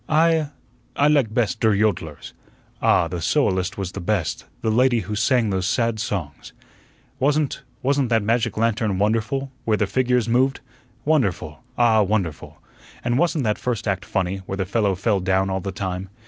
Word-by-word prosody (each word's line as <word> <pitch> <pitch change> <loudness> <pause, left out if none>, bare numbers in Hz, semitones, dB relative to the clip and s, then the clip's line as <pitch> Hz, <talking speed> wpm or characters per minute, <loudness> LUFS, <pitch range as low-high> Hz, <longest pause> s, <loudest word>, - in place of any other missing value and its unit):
"I 160 -1 +3 0.5
I 145 - +3
like 140 -7 +3
best 110 -3 0
der 110 -2 +3
yodlers." 95 -8 -1 0.5
"Ah, 85 - +3
the 85 0 -5
soloist 95 - +1
was 95 -3 -3
the - - -6
best 90 -3 -1 0.2
the 110 - 0
lady 120 0 +3
who 105 - -5
sang 115 0 +2
those 95 -1 -1
sad 115 +2 0
songs." 95 -10 -5 0.7
"Wasn't 145 +1 +1 0.2
wasn't 135 -1 +1
that 115 -2 +2
magic 115 +2 0
lantern 110 -3 +1
wonderful, 115 +7 0
where 110 -2 +1
the 105 - +1
figures 125 +1 +1
moved? 130 +3 +2 0.5
Wonderful 95 - 0 0.2
ah, 115 -2 +4
wonderful! 100 -6 -2 0.5
And 120 +2 +1
wasn't 165 -4 +1
that 105 -2 0
first 120 -3 -2
act 95 -1 -1
funny, 95 -1 -1
where 95 - -4
the 95 - -1
fellow 100 0 +1
fell 100 +2 +1
down 95 +1 +1
all 95 0 -1
the 95 - -4
time? 95 +1 -4
110 Hz, 170 wpm, -22 LUFS, 95-125 Hz, 0.7 s, ah